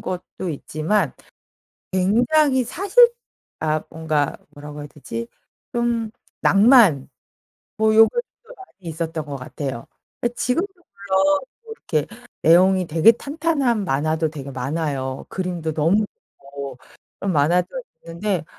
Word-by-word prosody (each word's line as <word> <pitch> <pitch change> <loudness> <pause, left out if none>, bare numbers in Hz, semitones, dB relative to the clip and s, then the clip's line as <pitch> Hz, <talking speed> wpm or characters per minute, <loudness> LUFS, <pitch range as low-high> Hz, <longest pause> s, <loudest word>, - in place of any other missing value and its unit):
것도 180 0 -5
있지만 155 +4 -1 0.8
굉장히 250 +9 +3
사실 405 - +4 0.5
아 155 -1 0
뭔가 155 -3 -1
뭐라고 150 0 -10
해야 145 - -7
되지 115 -6 -7 0.5
좀 235 -2 0 0.3
낭만 200 - +5 0.7
뭐 220 0 +3
요런 225 +1 +8
것도 480 0 -7
많이 195 - -12
있었던 160 -1 -4
거 145 -1 -6
같아요. 130 -1 -6 0.3
어 - - +2
지금도 305 +11 0
물론 200 - 0 0.2
뭐 455 - -12
이렇게 155 - -2 0.3
내용이 185 +2 +5
되게 165 +8 +6
탄탄한 280 - -1
만화도 155 +3 0
되게 140 -3 -8
많아요. 135 0 -3
그림도 175 -4 -3
너무 170 +8 +2 0.3
좋고 140 -1 -8 0.4
그런 195 -2 -1
만화도 165 +5 +2 0.4
있는데 170 0 -2
175 Hz, 250 characters per minute, -22 LUFS, 150-230 Hz, 0.8 s, 요런